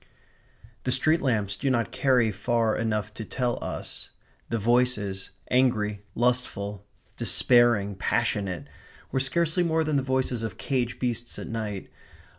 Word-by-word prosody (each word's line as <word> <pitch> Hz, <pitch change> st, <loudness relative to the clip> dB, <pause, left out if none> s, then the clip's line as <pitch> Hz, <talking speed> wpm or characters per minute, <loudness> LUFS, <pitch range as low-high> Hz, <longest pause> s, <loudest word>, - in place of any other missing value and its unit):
The 130 Hz, -, 0 dB
street 155 Hz, +6 st, +4 dB
lamps 105 Hz, -7 st, +1 dB
do 135 Hz, -, -1 dB
not 120 Hz, -3 st, +1 dB
carry 125 Hz, -5 st, +3 dB
far 110 Hz, +2 st, +1 dB
enough 105 Hz, -2 st, -1 dB
to 110 Hz, -, -6 dB
tell 120 Hz, +2 st, -2 dB
us. -, -, -6 dB, 0.4 s
The 115 Hz, -, 0 dB
voices, 110 Hz, -4 st, +1 dB, 0.2 s
angry, 110 Hz, -5 st, +2 dB
lustful, 105 Hz, -5 st, -1 dB, 0.3 s
despairing, 120 Hz, -5 st, +4 dB
passionate, 100 Hz, -3 st, -1 dB, 0.5 s
were 130 Hz, -, +1 dB
scarcely 165 Hz, +6 st, +1 dB
more 160 Hz, -2 st, +2 dB
than 155 Hz, -2 st, +1 dB
the -, -, +2 dB
voices 130 Hz, -2 st, 0 dB
of 110 Hz, -4 st, -4 dB
caged 125 Hz, -3 st, -1 dB
beasts 120 Hz, -1 st, -2 dB
at -, -, -6 dB
night. 110 Hz, -4 st, -4 dB
120 Hz, 135 wpm, -27 LUFS, 105-130 Hz, 0.5 s, street